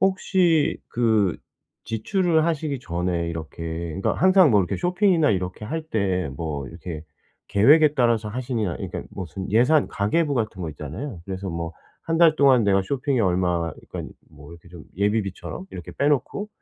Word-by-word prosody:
혹시 185 -4 +2
그 110 -6 +2 0.5
지출을 160 - +1
하시기 150 -4 -1
전에 85 -3 -2
이렇게 80 0 -7 0.4
그러니까 - - +1
항상 185 -3 +5
뭐 100 - +5
이렇게 90 - -2
쇼핑이나 180 - +2
이렇게 95 +1 -2
할 160 +5 -3
때 95 - -1
뭐 75 -4 -4
이렇게 85 -2 -8 0.4
계획에 145 +9 +5
따라서 115 -4 +2
하시냐 115 - -2
그러니까 - - -5
무슨 95 +1 -6
예산 130 +7 +4
가계부 145 +10 0
같은 110 -6 -2
거 80 - -3
있잖아요. 85 - -7
그래서 95 0 -4
뭐 85 0 -4 0.3
'1 165 0 -1
달 165 -2 +6
동안 130 -5 +5
내가 95 -1 +3
쇼핑에 135 +3 -1
얼마 90 -4 +1 0.2
그러니깐 - - -6 0.2
뭐 75 +2 -14
이렇게 85 +1 -15
좀 85 -2 -12
예비비처럼 105 - -2
이렇게 - - -8
빼놓고 145 - 0
110 Hz, 355 characters per minute, -23 LUFS, 90-150 Hz, 0.5 s, 달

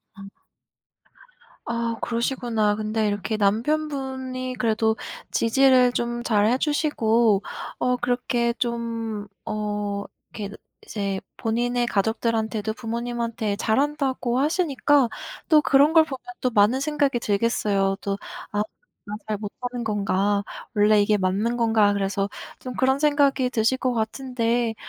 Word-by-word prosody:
아. 195 -1 -10 1.4
아, 235 0 -1
그러시구나. 235 -3 0
근데 215 0 -1
이렇게 205 +1 -2
남편분이 260 +2 -1
그래도 220 -1 +2 0.4
지지를 255 +1 +4
좀 240 0 -2
잘해 215 +2 +3
주시고 235 -8 +2 0.4
어, 250 0 +2
그렇게 240 -1 0
좀 230 -3 -3 0.2
어. 205 -1 -3 0.3
이렇게 205 -1 -5 0.3
이제 200 -2 -3 0.2
본인의 240 +2 0
가족들한테도 220 0 0
부모님한테 235 -2 -3
잘한다고 260 +1 0
하시니까 290 -3 +2 0.4
또 305 -2 +6
그런 285 +3 +4
걸 320 - +7
보면 270 -5 -7 0.2
또 255 - +2
많은 215 +4 +4
생각이 285 -4 +1
들겠어요. 200 -3 +1
또 200 +1 -2 0.3
'아, 205 0 0 0.4
내가 210 0 -5
잘 215 -1 -1
못하는 245 +4 -5
건가? 205 -1 +1 0.3
원래 210 0 +5
이게 210 +1 +3
맞는 200 +5 0
건가?' 220 -3 +3
그래서 200 0 -1 0.3
좀 255 -1 -6
그런 265 +1 +2
생각이 285 -3 +3
드실 230 +1 +1
것 255 -1 0
같은데 235 0 -1
230 Hz, 265 characters per minute, -24 LUFS, 210-255 Hz, 1.4 s, 걸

